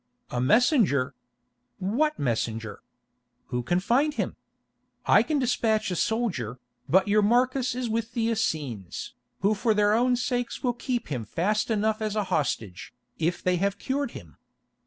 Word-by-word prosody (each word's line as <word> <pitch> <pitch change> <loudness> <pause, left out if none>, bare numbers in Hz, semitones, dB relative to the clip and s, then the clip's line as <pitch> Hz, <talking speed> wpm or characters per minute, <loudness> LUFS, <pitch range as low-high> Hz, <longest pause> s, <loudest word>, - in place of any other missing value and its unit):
"A 120 - -1
messenger! 150 - +3 0.6
What 250 +11 0
messenger? 115 -4 -2 0.7
Who 125 -1 -1
can 175 +9 +1
find 275 +10 +2
him? - - -2 0.7
I - - +6
can 310 - 0
despatch 225 -5 +1
a - - -1
soldier, 175 - -1 0.3
but 190 +4 +4
your 210 +1 +4
Marcus 250 +3 +2
is 250 -1 -2
with 225 0 -2
the 230 -1 0
Essenes, 150 - -3 0.3
who 200 +2 +3
for 215 +1 +1
their 205 0 +3
own 245 +3 +3
sakes 245 0 -2
will 245 -2 +2
keep 245 0 -3
him 125 -6 -2
fast 210 - 0
enough 220 0 +1
as 215 -1 -2
a 210 - +1
hostage, 110 -7 -2 0.2
if 170 +2 -1
they 180 -1 +2
have 200 +2 0
cured 275 +4 -2
him. - - -14
215 Hz, 155 wpm, -26 LUFS, 155-240 Hz, 0.7 s, I